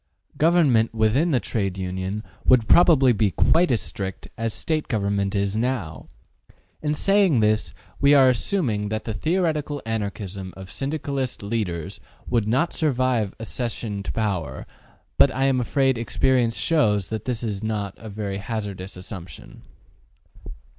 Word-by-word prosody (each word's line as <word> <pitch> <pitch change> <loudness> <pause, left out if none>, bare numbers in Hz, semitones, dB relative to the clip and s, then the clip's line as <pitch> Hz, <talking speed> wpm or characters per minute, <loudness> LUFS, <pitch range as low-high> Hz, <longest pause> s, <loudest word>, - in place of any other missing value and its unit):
Government 145 -10 +3
within 110 +10 +2
the 135 -6 +2
Trade 100 -6 -2
Union 95 +3 -3 0.2
would 120 -4 +4
probably 150 -8 +6
be 105 -1 +2
quite 165 - +3
as 120 -4 +1
strict 95 -1 -6
as 115 -1 -2
State 155 +6 -2
government 100 -3 -1
is 100 0 0
now. 110 - -2 0.7
In 150 0 0
saying 195 - +3
this 105 -6 +1 0.3
we 140 +1 +5
are 135 -2 +7
assuming 120 - 0
that 110 0 -3
the 110 - -4
theoretical 155 - -1
Anarchism 100 -4 -4
of 95 0 -10
Syndicalist 140 -4 -3
leaders 100 -7 -3 0.3
would 115 -4 +1
not 130 +10 +1
survive 130 -8 0
accession 115 -3 -4
to - - -4
power, 95 - -2 0.5
but 140 - +7
I 130 0 -2
am 135 -1 +3
afraid 130 0 +1
experience 120 0 +1
shows 105 - +1
that 110 -1 -4
this 125 -2 -3
is 105 -4 -3
not 105 -3 -3
a 110 - -9
very 100 -1 -4
hazardous 100 -3 -5
assumption. 90 -5 -10
110 Hz, 140 wpm, -23 LUFS, 100-135 Hz, 0.7 s, are